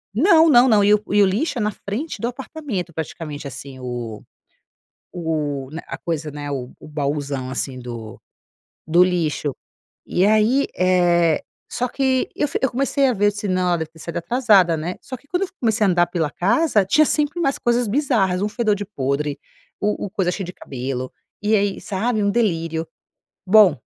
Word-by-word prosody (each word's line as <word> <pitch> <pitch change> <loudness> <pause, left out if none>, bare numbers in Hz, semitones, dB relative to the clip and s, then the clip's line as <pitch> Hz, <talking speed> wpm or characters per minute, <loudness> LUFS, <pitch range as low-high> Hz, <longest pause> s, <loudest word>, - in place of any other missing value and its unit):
Não! 325 - +6
Não, 245 -1 +7
não. 215 -4 +5
E 205 +1 +5
o 210 - +3
e 205 - +5
o - - +6
lixo 225 - 0
é 235 - -1
na 210 - +1
frente 215 +5 -5
do 235 - 0
apartamento, 245 - -5
praticamente 150 -2 -6
assim. 130 0 -9
O 120 -4 -5 0.9
o 150 -6 -2
na 160 +3 -7
a - - -6
coisa 155 -2 -3
né 145 0 -6
o 130 -3 -4
o - - -12
bauzão 140 -3 -2
assim 130 0 -3
do 120 -3 -8 0.7
do 170 +3 +5
lixo. 155 -6 -1 0.5
E 185 - +2
aí, 220 +6 +3
eh, 175 -3 +3 0.3
só 250 - -1
que 260 0 0
eu 295 - +1
fi - - -2
eu 265 - +1
comecei 275 +2 +1
a 255 - +2
ver 205 -1 +1
eu - - +6
disse: 205 0 -5
"Não, 185 -1 +1
ela 175 - +2
deve 160 -1 -5
ter 160 - -18
saído 170 +1 -5
atrasada, 205 -5 +3
né?" 165 +3 -4
Só 265 - -7
que 270 +3 -17
quando 355 +5 -1
eu - - -2
fu - - -22
comecei 220 -3 +2
a - - +3
andar 175 -1 +3
pela 165 -3 -1
casa, 220 - +2
tinha 305 +10 +4
sempre 300 +4 0
umas 275 -5 0
coisas 240 -1 +1
bizarras. 205 -8 +1
Um 210 - 0
fedor 215 -2 +1
de 205 0 -5
podre. 140 -4 -2 0.4
O 210 0 -1
o - - -5
coisa 190 -3 0
cheio 195 +1 -4
de 180 - -8
cabelo. 130 -1 -5 0.3
E 215 +1 +2
aí, 200 -1 0
sabe, 215 +2 -1
um 200 - +2
delírio. 165 -8 0 0.6
Bom, 195 -4 +6
185 Hz, 200 wpm, -21 LUFS, 155-235 Hz, 0.9 s, Não